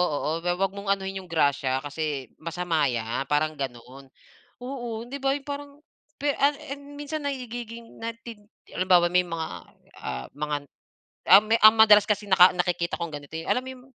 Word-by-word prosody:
oo. 150 - -2 0.2
Huwag 190 +2 +1
mong 200 0 -9
anuhin 195 0 -5
'yong 185 - -12
grasya, 140 -4 +1
kasi 145 -3 -4
masama 165 -2 0
'yan 120 +2 -2
parang 155 +1 +1
ganon, 130 +1 -7 0.6
oo, 240 -4 -5
'di 275 +4 -7
ba, 270 +1 +1
'yong 285 - -7
parang, 285 0 -5 0.4
pe 285 +1 0
an 285 +1 +3 0.2
en, 285 +1 -8
minsan 290 +1 -5
nagiging 240 -4 -6
na 230 0 -3
tid 230 -2 -11 0.3
halimbawa 180 -1 +4
may 180 0 +4
mga 165 -1 -3 0.5
ah, 65 -1 -5
mga 150 0 -2 0.7
an 195 +3 +9
ah, - - -1
ang - - -8
madalas 210 -2 +8
kasi 210 -1 -1
naka 185 -1 +7
nakikita 175 -1 -1
kong 170 -2 -4
ganito 145 +2 -10
'yon, - - -9
alam 255 - +1
mo 260 - -8
'yong 250 -1 -13
185 Hz, 175 wpm, -26 LUFS, 150-240 Hz, 0.7 s, an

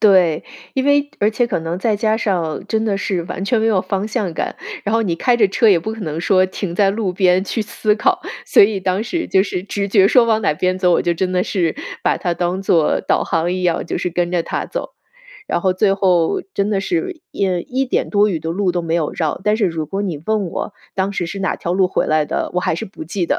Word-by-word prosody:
对， 185 -7 +4 0.3
因 265 - 0
为 285 0 +3
而 210 - +3
且 240 +2 +1
可 195 -8 -2
能 165 +2 -3
再 215 +2 +1
加 220 +1 +1
上 180 -8 -1
真 220 -1 0
的 210 -3 0
是 185 -4 -1
完 180 - -6
全 235 +3 +2
没 225 - +1
有 210 -4 +3
方 195 +2 -2
向 215 -5 -2
感， - - -3 0.3
然 205 - -2
后 225 - +3
你 180 -6 0
开 245 +8 +2
着 210 -4 +4
车 225 +4 +2
也 190 -4 +5
不 215 +7 -4
可 225 - -8
能 160 -4 -3
说 185 +1 +3
停 185 -1 -5
在 195 +1 +3
路 200 -2 -1
边 185 0 +3
去 215 +3 -2
思 210 0 0
考。 365 - +1 0.2
所 - - +6
以 200 -1 +2
当 185 +2 0
时 335 +9 -3
就 190 - +3
是 185 -2 -3
直 200 0 -3
觉 195 -1 +5
说 240 +3 +5
往 220 -1 +1
哪 155 - +2
边 185 +4 0
走， 180 -1 +3
我 - - +3
就 175 - 0
真 185 +2 -1
的 180 0 +2
是 175 -5 0 0.3
把 - - +1
它 175 -1 -1
当 180 +2 -1
做 165 -5 +2
导 - - +1
航 165 +1 0
一 185 0 -2
样， 175 -1 +1
就 - - -2
是 180 - -2
跟 175 0 -1
着 175 -2 +1
它 - - -3
走。 - - -5 0.6
然 - - 0
后 185 -1 +2
最 195 +1 +2
后 185 - +2
真 200 +1 0
的 205 -2 +1
是 345 - -2
一 - - -2 0.2
一 265 +2 0
点 - - -1
多 210 0 +3
余 170 -5 -2
的 160 - -3
路 185 +1 0
都 175 0 -1
没 165 0 -1
有 160 -3 0
绕。 155 -3 -2
但 210 +1 +2
是 220 - +2
如 165 -3 -2
果 195 +6 -3
你 175 -8 -3
问 215 -2 0
我 190 - -5 0.2
当 195 +1 -1
时 175 -3 -2
是 195 - -6
哪 190 - 0
条 175 - -2
路 185 -1 +3
回 - - 0
来 155 -1 +2
的， - - -2
我 180 - +1
还 - - 0
是 165 - -4
不 185 - -9
记 175 +3 -2
得。 - - 0
190 Hz, 280 characters per minute, -19 LUFS, 175-215 Hz, 0.6 s, 所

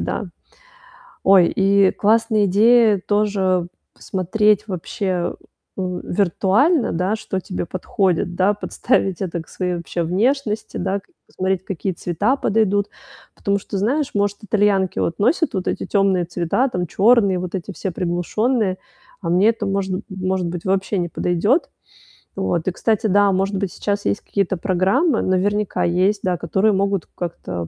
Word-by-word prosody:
да. - - -3 1.0
Ой, 190 -3 +6
и 195 0 +4
классная 220 0 +2
идея 215 +2 +4
тоже 195 -4 +1 0.3
посмотреть 210 +3 0
вообще 185 -1 -2 0.4
у 180 -2 -3
виртуально, 205 - +1
да, 185 +5 0
что 190 -3 -4
тебе 180 -1 -4
подходит, 180 0 -1
да? 190 +3 +3
Подставить 195 -3 -1
это 175 -3 -3
к - - -22
своей, 180 -1 -2
вообще, 170 0 -3
внешности, 220 - -1
да? 190 +2 -1
Как 360 - -34
посмотреть, 190 0 -2
какие 195 +1 -3
цвета 180 - 0
подойдут. 205 -4 +1 0.5
Потому 200 0 -1
что, 195 - -6
знаешь, 260 +9 0
может, 205 0 0
итальянки 205 -3 +1
вот 170 - -2
носят 280 - +2
вот 185 -3 -3
эти - - -2
темные 195 -3 +2
цвета 175 +10 0
там, 180 -6 -3
черные, 200 0 +3
вот 180 -1 -5
эти 190 +1 -5
все 190 - -4
приглушенные, 185 +5 -1 0.4
а 170 - -3
мне 185 +5 +4
это 230 - -1
можн 195 -1 -1
может 185 -1 -2
быть, 170 0 -5
вообще 195 +1 0
не 175 -1 -2
подойдет. 190 - +1 0.7
Вот. 175 -3 -1
И - - +2
кстати, 220 +4 0
да, 205 0 +4
может 195 +1 0
быть, 190 -3 -3
сейчас 205 0 -2
есть - - 0
какие-то 195 -2 -1
программы, 195 - +1
наверняка 205 +2 0
есть, 185 +4 +1
да, 180 -2 0
которые 190 +6 +1
могут 195 -2 0
как-то 95 - -5
195 Hz, 150 wpm, -20 LUFS, 180-210 Hz, 1.0 s, Ой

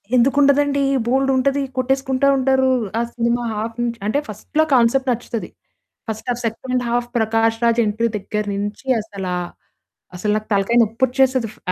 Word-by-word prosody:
ఎందుకుండదండి? 280 +2 +3 0.2
బోలెడుంటది 270 +2 +1 0.2
కొట్టేసుకుంటా 265 +1 +1
ఉంటారు. 265 0 +2 0.3
ఆ - - +2
cinema 235 0 0
half 225 +2 -4
నుంచ్ 235 -1 -2
అంటే 250 +7 +1
ఫస్ట్‌లో 220 +9 -1
కాన్సెప్ట్ 260 +2 +3
నచ్చుతది. 235 -1 -4 0.6
First 220 +3 -5
of 240 - -6
second 250 +3 -2
half 240 0 -1
'Prakash 225 0 +1
Raj' 235 0 +3
entry 220 +3 0
దగ్గర 210 +1 -3
నుంచి 205 +5 -5
అసలా 195 -4 -5 0.8
అసలు 210 +4 -1
నాకు 215 0 -3
తలకాయ 200 +4 +2
నొప్పిచ్చేస్తది 255 +2 +1
ఫ్ - - -22
240 Hz, 140 wpm, -20 LUFS, 220-265 Hz, 0.8 s, ఎందుకుండదండి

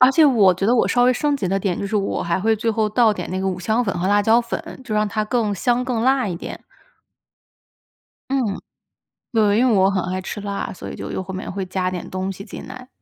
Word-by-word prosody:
而 255 +1 +8
且 320 - +5
我 220 -10 +5
觉 185 - -3
得 235 - +4
我 240 - +3
稍 245 - +2
微 255 - +5
升 290 +3 0
级 200 - -2
的 195 +2 +1
点， 190 -3 -1
就 200 - -3
是 210 - -1
我 200 -1 -1
还 170 +2 0
会 220 +3 +3
最 225 +2 0
后 220 -1 +1
倒 220 0 +4
点 - - -5
那 185 +1 -2
个 190 - 0
五 185 -1 -3
香 220 +7 0
粉 195 - -2
和 180 - -1
辣 205 0 +4
椒 225 +3 +4
粉， 265 +8 -6
就 215 - -3
让 210 0 +2
它 215 +1 -1
更 215 -2 0
香、 245 +5 +1
更 245 -3 -1
辣 260 0 +3
一 180 - -3
点。 - - -8 1.7
嗯。 250 -8 0 0.7
对， 215 -2 +3
因 255 +2 +4
为 - - +3
我 190 -1 +4
很 195 -2 0
爱 185 +1 -2
吃 200 - -6
辣， 200 -1 -4
所 - - -9
以 - - -7
就 - - -6
又 - - -3
后 190 0 -7
面 185 - -5
会 195 0 -3
加 185 0 -1
点 180 -1 -6
东 185 +1 -3
西 195 - -9
进 - - -9
来。 255 0 -10
210 Hz, 280 characters per minute, -21 LUFS, 190-240 Hz, 1.7 s, 而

